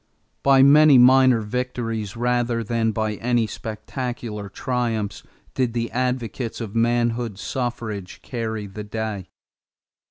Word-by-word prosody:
= - - -46
By 135 -1 +7
many 145 0 +7
minor 130 -1 +6
victories 115 -2 -3
rather 120 -1 0
than 115 0 0
by 110 -1 -2
any 120 -1 +1
spectacular 110 -1 -5
triumphs 115 -2 -2 0.3
did 125 -3 0
the 115 -1 -2
advocates 125 -2 -2
of 110 -4 -6
manhood 120 -2 0
suffrage 115 -6 -4
carry 110 -3 -4
the 100 +2 -7
day. 105 -3 -4
115 Hz, 120 wpm, -23 LUFS, 110-125 Hz, 0.3 s, By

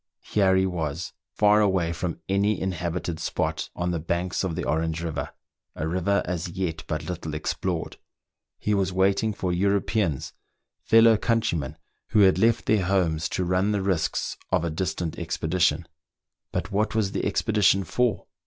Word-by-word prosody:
Here 95 -2 +2
he 95 0 +3
was, 80 -3 -3 0.2
far 105 0 +5
away 95 -5 +2
from 85 +1 -4
any 100 +2 +1
inhabited 85 -2 -3
spot, - - -2
on 90 0 -1
the 85 - -1
banks 85 +4 -1
of 90 -4 -2
the - - -3
Orange 80 +1 -1
river, 80 -4 -3 0.5
a 75 - -3
river 95 +4 +1
as 90 0 -3
yet 85 -4 -3
but 80 - -2
little 80 -4 -5
explored. 75 - -3 0.6
He 105 - -1
was 95 -2 +1
waiting 95 +3 +2
for 95 -3 -2
Europeans, 100 - 0 0.5
fellow 115 0 +5
countrymen 85 - 0 0.3
who 110 - +3
had 95 -1 +5
left 115 +2 +3
their 105 -3 +2
homes 85 -4 +1
to 90 - -1
run 90 +4 +1
the 100 -2 0
risks 95 -5 -1
of 90 -3 +2
a 85 - -1
distant 85 0 -3
expedition. 80 0 0 0.6
But - - -3
what 105 +2 0
was 105 -3 +1
the - - -2
expedition 100 -2 +2
for.? 120 0 0
90 Hz, 160 wpm, -25 LUFS, 85-100 Hz, 0.6 s, far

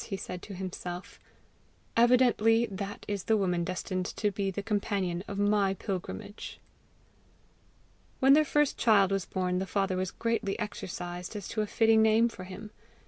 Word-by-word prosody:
he 195 - -4
said 180 -1 -6
to 200 - -8
himself. 180 -1 -6 0.8
"Evidently 235 -1 +4
that 200 -1 -6
is 205 -2 -3
the 220 - +3
woman 180 -4 0
destined 185 +1 -3
to 210 -2 -1
be 195 0 -1
the 195 +1 -4
companion 195 -4 -1
of 200 - -5
my 205 -1 +2
pilgrimage!" 185 - -6 1.6
When 270 +1 +6
their 310 +2 +6
first 295 -1 +1
child 200 -4 +4
was 195 -2 0
born, 180 -1 -1
the 190 - -3
father 195 0 0
was 185 0 -1
greatly 230 -3 -1
exercised 180 -3 -5
as 205 -3 -5
to 215 - -1
a 210 - -1
fitting 225 +1 +4
name 220 +2 +4
for 185 -5 -9
him. 200 +3 -9
200 Hz, 160 wpm, -29 LUFS, 185-220 Hz, 1.6 s, When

